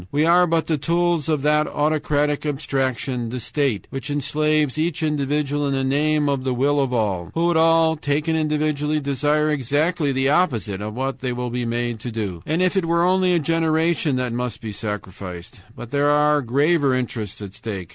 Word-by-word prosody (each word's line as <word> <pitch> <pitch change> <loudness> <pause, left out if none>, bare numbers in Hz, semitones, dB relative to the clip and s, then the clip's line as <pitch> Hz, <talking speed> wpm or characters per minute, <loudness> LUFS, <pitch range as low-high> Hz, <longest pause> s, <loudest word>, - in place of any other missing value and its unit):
WE 150 +2 +2
ARE 175 +2 +5
BUT 165 -1 +1
THE 155 -3 -1
TOOLS 170 0 0
OF 150 -3 0
THAT 150 0 +3
AUTOCRATIC 150 -1 0
ABSTRACTION 135 -4 -2
THE 125 +2 -4
STATE, 125 -4 -1
WHICH 135 +2 -5
ENSLAVES 150 0 0
EACH 165 +1 -1
INDIVIDUAL 145 -1 0
IN 140 - 0
THE 135 - 0
NAME 145 +2 +1
OF 140 -2 0
THE 130 -1 -1
WILL 145 +3 +2
OF 135 -2 0
ALL, 100 -8 -1
WHO 165 +1 +1
WOULD 175 -1 +2
ALL, 165 0 +4
TAKEN 150 +2 -1
INDIVIDUALLY, 150 -1 0
DESIRE 150 +2 +1
EXACTLY 150 +3 0
THE 135 0 +1
OPPOSITE 115 - +1
OF 105 +1 -5
WHAT 135 +1 -3
THEY 125 -1 -2
WILL 125 0 -4
BE 120 0 -2
MADE 120 0 -2
TO 120 +2 -6
DO. 100 -7 -4
"And 160 +4 +1
if 185 +2 +1
it 190 -3 +1
were 170 +1 +2
only 185 0 +3
a - - +3
generation 160 -1 +1
that 125 -2 -2
must 125 0 -3
be 110 - -6
sacrificed! 95 -4 -7
But 120 -1 -9
there 145 0 +2
are 150 0 +3
graver 140 +2 +2
interests 115 -5 -4
at 95 -2 -8
stake. 100 -6 -6
145 Hz, 195 wpm, -22 LUFS, 125-155 Hz, -, ARE